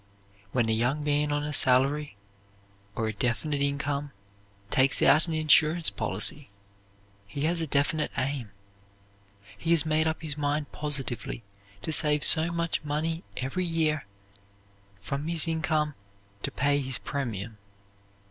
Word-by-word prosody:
When 120 -1 0
a - - 0
young 125 +7 0
man 150 0 0
on 145 0 -1
a 150 0 -4
salary 135 -1 +4 0.8
or 110 - -2
a 110 - -3
definite 130 +7 -2
income 140 0 -2 0.6
takes 130 +1 +6
out 155 +4 +4
an 165 - -3
insurance 155 +1 +3
policy 110 +7 +2 0.8
he 140 +8 -7
has 165 +2 0
a 160 - -3
definite 145 +2 0
aim. 130 -4 -3 1.1
He 165 +11 -6
has 165 -1 +3
made 155 0 +1
up 160 0 -3
his 150 -3 +1
mind 145 0 -2
positively 135 -5 -3 0.4
to - - -3
save 150 -1 +3
so 165 +1 +5
much 170 -1 -2
money 160 +3 -3
every 135 +8 -3
year 160 - -1 0.9
from 140 +9 -5
his 165 0 +1
income 160 -2 -1 0.5
to - - -3
pay 145 +1 0
his 130 -1 -4
premium. 115 -6 -5
145 Hz, 140 wpm, -27 LUFS, 135-155 Hz, 1.1 s, takes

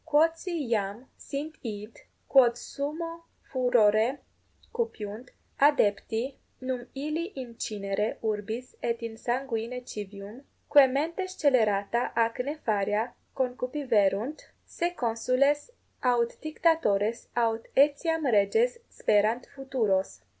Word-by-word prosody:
Quodsi 325 0 +1
iam 215 +1 -1
sint 300 +3 -6
id, 215 -1 -6 0.3
quod 245 -3 +5
summo 330 +6 -5 0.2
furore 240 -1 +3 0.6
cupiunt, 245 - -4 0.3
adepti, 255 -2 +2 0.2
num 255 -1 -4
illi 305 +4 -2
in 255 -3 -7
cinere 210 -1 -2
urbis 220 +3 -3
et 235 0 -2
in 230 -1 -5
sanguine 245 0 -3
civium, 205 +3 -8 0.3
quae 285 -2 +8
mente 320 +8 -1
scelerata 235 - +2
ac 230 0 +1
nefaria 225 -5 -1 0.2
concupiverunt, 250 -2 0 0.2
se 345 - -1
consules 255 - +1 0.3
aut 240 -2 +2
dictatores 290 -9 +1
aut 230 -1 +1
etiam 295 +3 +3
reges 445 - +3
sperant 215 +4 +2
futuros? 220 - -1
245 Hz, 95 wpm, -28 LUFS, 220-285 Hz, 0.6 s, quae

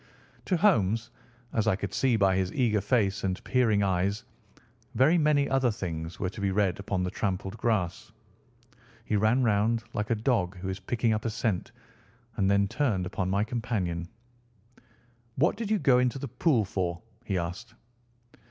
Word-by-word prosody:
To 185 - +1
Holmes, 115 - +2 0.4
as 110 - 0
I - - +4
could 100 0 -5
see 130 -3 +2
by 95 -3 +3
his 95 0 0
eager 110 -6 +1
face 100 -6 +1
and 95 0 -2
peering 115 -6 +2
eyes, 95 +2 0 0.7
very 155 +7 +4
many 150 -2 +3
other 135 -2 +2
things 85 -6 -5
were 95 -2 -2
to 100 - -8
be 100 - +1
read 95 -2 +1
upon 100 -2 -2
the 90 - -2
trampled 95 0 -3
grass. 105 -5 -1 0.9
He 110 - -1
ran 110 +5 +3
round, 110 +1 +2
like 105 0 -2
a 115 - +2
dog 105 -5 0
who 95 +1 -5
is 95 +1 -4
picking 115 +3 0
up 110 - -2
a - - +1
scent, 110 -4 -2 0.7
and 95 -1 +2
then 100 0 +3
turned 105 -7 0
upon 95 0 -2
my 100 +2 +1
companion. 105 -8 -2 1.3
"What 160 +7 +2
did 225 -3 -4
you 215 - +3
go 135 -7 +4
into 125 +1 +1
the 140 - -5
pool 125 - +2
for?" 90 -3 -3 0.2
he 95 -5 -2
asked. 90 +7 -5
105 Hz, 170 wpm, -28 LUFS, 95-120 Hz, 1.3 s, I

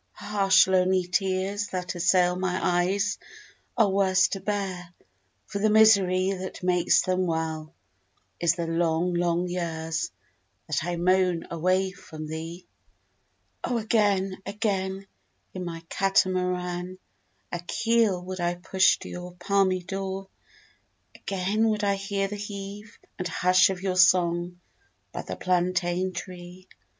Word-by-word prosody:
Harsh 195 -2 +3
lonely 185 0 +2
tears 190 +3 -1
That 180 -1 -4
assail 180 0 +3
my 185 0 -1
eyes 190 +4 +1 0.6
Are 220 -3 +5
worse 190 -1 +3
to 195 - -3
bear, 185 -3 -4 0.5
For 200 - -5
the 215 +2 +2
misery 195 -4 +5
That 185 -1 -6
makes 180 -1 +3
them 185 0 0
well 160 -1 -3 0.6
Is 170 -1 +2
the 170 -1 -3
long, 165 +1 0
long 175 0 0
years 165 -2 -3 0.6
That 155 0 -1
I 175 +1 -2
moan 180 -1 +2
away 185 +3 +1
from 160 -4 -9
thee! 165 +3 -7 1.0
O 245 - 0
again, 205 -4 +1
again, 195 -2 -2 0.5
In 185 -1 -5
my 165 -1 -6
katamaran 180 -1 0 0.5
A 175 - -3
keel 225 0 +1
would 185 0 -6
I 175 0 0
push 185 +2 +3
To - - -8
your 180 0 -8
palmy 185 0 +1
door! 195 +1 -5 0.8
Again 200 +4 0
would 215 -1 -1
I 200 -1 +2
hear 195 0 -2
The 205 +1 -6
heave 205 +1 -8 0.2
and 180 - -2
hush 185 +2 +4
Of 190 -1 -4
your 185 -2 -1
song 175 0 +3 0.5
by - - -5
the - - -6
plantain 180 0 0
tree. 180 0 -9
185 Hz, 130 wpm, -26 LUFS, 175-195 Hz, 1.0 s, Are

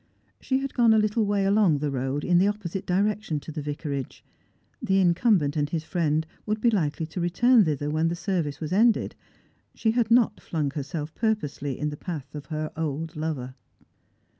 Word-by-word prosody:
She 260 - 0
had 275 -1 -4
gone 235 -3 +5
a - - +4
little 215 0 +1
way 200 -1 +1
along 195 -6 +4
the 145 0 -2
road, 135 +2 -2
in 175 -1 +4
the 190 - +4
opposite 195 -3 -3
direction 200 -3 0
to 160 - -8
the 155 0 -5
vicarage. 145 -2 -5 0.6
The 190 - +1
incumbent 175 -4 +3
and 145 -1 0
his 160 -1 -2
friend 160 -2 0 0.2
would 215 +1 0
be 235 +2 +3
likely 160 -6 0
to 165 +3 -5
return 220 +6 +4
thither 150 -1 -1
when 160 +2 +1
the 170 - -1
ser 175 +2 -1
vice 145 -1 -5
was 160 +2 -4
ended. 225 +3 +3 0.6
She 220 - +1
had 230 -1 +1
not 230 -3 +3
flung 150 -4 -2
herself 150 +2 -5
purposely 150 - -2
in 150 - -1
the 150 - -7
path 150 -6 -6
of 150 -2 -8
her 155 -1 -3
old 160 +1 -3
lover. 150 -5 -3
165 Hz, 190 wpm, -26 LUFS, 150-205 Hz, 0.6 s, gone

